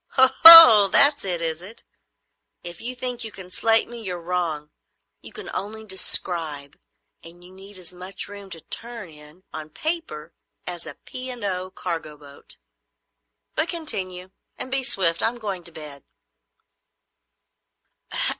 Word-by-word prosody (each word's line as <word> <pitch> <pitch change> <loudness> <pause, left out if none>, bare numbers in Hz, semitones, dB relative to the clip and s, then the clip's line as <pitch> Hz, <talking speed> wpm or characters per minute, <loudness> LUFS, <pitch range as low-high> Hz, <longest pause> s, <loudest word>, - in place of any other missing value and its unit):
"Oho! 260 -5 +9
that's 285 +8 +6
it, 175 -3 -2
is 160 0 -1
it? 205 +5 -10 0.8
If 175 -1 -11
you 250 +2 -7
think 245 -1 -6
you 220 - -9
can 185 -2 -14
slate 225 +3 +2
me, 240 -1 -11
you're 180 -4 -7
wrong. 165 -4 -5 0.5
You - - -14
can - - -11
only 220 +3 -7
describe, 165 -7 -2 0.5
and 170 +1 -16
you 180 - -17
need 195 +1 -11
as 180 -1 -9
much 185 +1 -9
room 200 -1 -13
to 165 -3 -11
turn 230 -2 -11
in, 150 +4 -19
on 155 -1 -9
paper, 240 - -4 0.3
as 175 -3 -9
a 150 - -10
P. 255 0 -11
and 245 -3 -9
O. 185 -2 -5
cargo 165 -5 -7
boat. 145 -1 -11 1.0
But 315 +2 -2
continue, 185 - -6 0.3
and 260 - -4
be 270 0 -1
swift. 185 -10 -1
I'm 235 +2 -1
going 200 -6 -7
to 170 - -10
bed." 150 -3 -13
185 Hz, 145 wpm, -21 LUFS, 165-230 Hz, 1.0 s, Oho